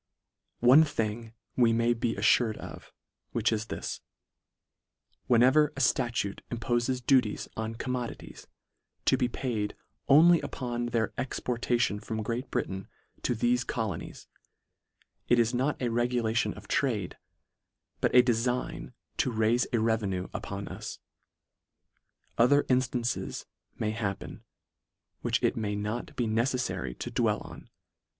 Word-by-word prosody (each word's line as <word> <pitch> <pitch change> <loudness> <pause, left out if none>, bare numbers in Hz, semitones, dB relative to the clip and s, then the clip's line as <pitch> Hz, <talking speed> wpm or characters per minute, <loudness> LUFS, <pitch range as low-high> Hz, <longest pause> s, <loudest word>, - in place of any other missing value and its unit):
One 130 +6 +8
thing 115 -5 -3 0.2
we 120 -2 +4
may 115 +1 +3
be 115 0 -1
affured 110 +2 +3
of, - - -10 0.4
which 115 0 +1
is 110 0 -2
this; - - -5 1.3
when 120 -1 +5
ever 150 +4 +5
a - - -3
ftatute 120 -6 +1
impofes 120 +2 -1
duties 125 -6 +2
on 110 0 -3
commodities, 125 0 -5 0.6
to - - +5
be 125 - +1
paid 115 -4 -3 0.3
only 165 +4 +7
upon 120 -4 -3
their 115 -2 0
exportation 120 -4 0
from 110 0 -4
Great 120 +5 -3
Britain 95 0 -3 0.3
to 125 - 0
thefe 120 +2 +1
colonies, 110 -8 -4 1.0
it 120 - +5
is 120 +1 +3
not 130 +4 0
a 125 - 0
regulation 120 -1 0
of - - -12
trade, 110 -10 0 0.8
but - - +1
a 125 - +9
delign 125 +1 -1 0.2
to - - +1
raife 110 +2 +2
a 120 - +2
revenue 105 -5 0
upon - - -5
us. - - -7 1.4
Other 145 +5 +5
instances 125 -2 0 0.3
may 105 - -1
hap 105 -3 -2
pen, - - -9 0.8
which - - 0
it - - +2
may 105 -2 -2
not 105 +4 -4
be 120 - 0
neceffary 115 - -1
to - - -5
dwell - - +1
on. - - -11
120 Hz, 130 wpm, -29 LUFS, 110-125 Hz, 1.4 s, a